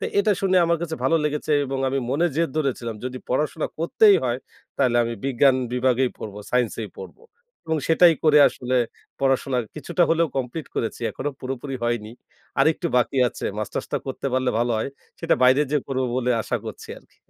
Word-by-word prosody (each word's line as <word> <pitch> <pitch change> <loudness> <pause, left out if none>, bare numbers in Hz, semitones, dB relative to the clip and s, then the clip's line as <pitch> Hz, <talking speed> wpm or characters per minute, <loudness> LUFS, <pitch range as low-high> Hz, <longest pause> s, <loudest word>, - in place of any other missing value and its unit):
তে - - -3
এটা 205 +1 +3
শুনে 190 -1 +2
আমার 170 -1 +1
কাছে 160 -2 -3
ভালো 165 - +4
লেগেছে 150 0 -1
এবং 135 0 -3
আমি 135 +1 -1
মনে 165 +6 +2
জেদ 165 -1 +1
ধরেছিলাম 120 -6 -2
যদি 130 0 -4
পড়াশোনা 150 +4 0
করতেই 200 +5 +5
হয় 120 0 0 0.4
তাহলে 120 -2 +2
আমি 115 0 -2
বিজ্ঞান 135 0 +4 0.2
বিভাগেই 125 0 +2
পড়ব, 105 -2 -7 0.2
সাইন্স 125 -3 +1
এই 105 - -5
পড়ব - - -9 0.5
এবং 160 0 0
সেটাই 165 +1 +6
করে 150 -1 +6
আসলে 125 +1 -2 0.4
পড়াশোনা 135 -1 +1 0.2
কিছুটা 175 +3 -1
হলেও 165 -1 +3
কমপ্লিট 135 +4 -3
করেছি। 115 - -3
এখনো 145 +2 -4
পুরোপুরি 135 +1 -5
হয়নি। 115 -2 -2 0.5
আরেকটু 155 +4 +2
বাকি 125 +2 +1
আছে। - - -6
মাস্টার্সটা 110 - -3
করতে 135 +1 -4
পারলে 130 -1 +1
ভালো 120 +1 +1
হয়। 110 - -2 0.3
সেটা - - +2
বাইরে 130 +3 +6
যেয়ে 150 -3 0
করব 130 -1 -1
বলে 125 -1 0
আশা - - -1
করছি - - -8
আরকি। - - -28
135 Hz, 180 wpm, -23 LUFS, 125-155 Hz, 0.5 s, সেটাই